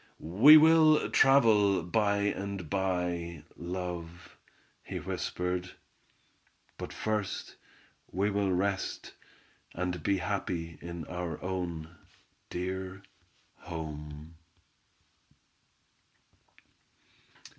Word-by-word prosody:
"We 110 - +8
will 155 0 +5
travel 110 -9 +5
by 100 +3 +1
and 100 -4 -3
by, 90 -4 -2
love," 90 -1 -6 0.5
he - - -6
whispered. 90 0 -3 1.0
"But - - -6
first 105 -2 -3 0.6
we 100 +4 0
will 100 -1 +1
rest 95 +1 -2 0.6
and 90 -1 -2
be 100 +5 +1
happy 90 -3 -3
in 85 -2 -6
our 90 0 -5
own 90 -3 -4 0.5
dear 95 +1 -4 0.5
home!" 75 -1 -8
90 Hz, 75 wpm, -30 LUFS, 85-100 Hz, 1.0 s, We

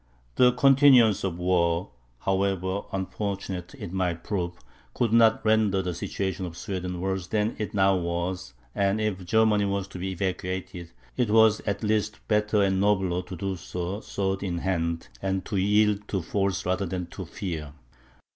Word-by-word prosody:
The 125 - +5
continuance 130 -4 +6
of 90 -3 -2
war, 90 0 +1 0.3
however 95 0 0
unfortunate 95 -2 -4
it 85 - -7
might 90 -3 -1
prove, 90 -4 -2 0.4
could 115 -3 +1
not 115 -1 +5
render 110 -3 +3
the 90 -1 -2
situation 95 +2 -3
of 85 -1 -10
Sweden 90 -3 -4
worse 95 -1 -2
than 105 +1 0
it 105 -1 -4
now 95 -1 +4
was; 85 -2 -3 0.2
and 100 +1 +1
if 105 -4 -2
Germany 105 +2 +3
was 100 -1 -1
to 90 - -8
be 95 +2 -3
evacuated, 90 -2 -4 0.3
it 120 -3 +1
was 110 0 +5
at 100 +2 -1
least 105 0 0
better 105 -1 +2
and 95 -1 +1
nobler 95 -3 +2
to 90 - -8
do 95 +2 -3
so 90 +2 -4
sword 95 -3 -2
in 90 -3 -2
hand, 85 -2 -1
and 95 -1 -1
to 100 - -2
yield 105 +1 +2
to 95 -4 -2
force 100 +1 -1
rather 95 +2 0
than 90 0 -3
to 90 +3 -8
fear. 80 -4 -5
95 Hz, 165 wpm, -26 LUFS, 90-105 Hz, 0.4 s, continuance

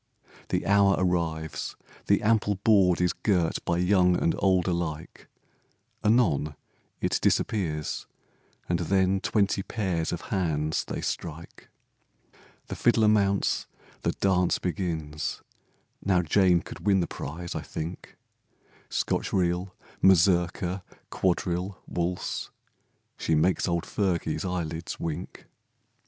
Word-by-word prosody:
The - - -1
hour 100 -1 +5
arrives, 80 -4 -1 0.3
the - - +3
ample 105 -1 +2
board 95 -3 +4
Is 90 0 +2
girt 90 -6 0
by 85 - +1
young 90 0 +4
and 85 - +2
old 95 -2 +3
alike, 85 -3 -3 0.8
Anon 90 - +2 0.4
it - - 0
disappears, 80 -8 0 0.6
and 85 -1 0
then 95 +2 +2
Twenty 100 -2 +1
pairs 95 -6 -2
of 85 - -3
hands 80 -5 0
they - - -4
strike, 85 0 -6 1.0
The - - -6
fiddler 115 -2 +3
mounts, 100 -2 +2 0.3
the - - 0
dance 90 -2 +2
begins, 80 -5 -3 0.6
Now 90 -2 +2
Jane 90 +1 +4
could - - -9
win 100 -2 +3
the - - +1
prize, 85 +2 -6
I - - -3
think, 80 +3 -7 0.7
Scotch - - -1
reel, 90 0 0 0.3
mazurka, 90 0 +3 0.3
quadrille, 90 +1 -1
waltz, 90 +1 -3 0.7
She 80 - +1
make's 85 +5 +2
old 85 -1 0
Fergie's 90 -3 -1
eyelids 85 -2 -3
wink. 85 +2 -5
90 Hz, 115 wpm, -27 LUFS, 85-95 Hz, 1.0 s, hour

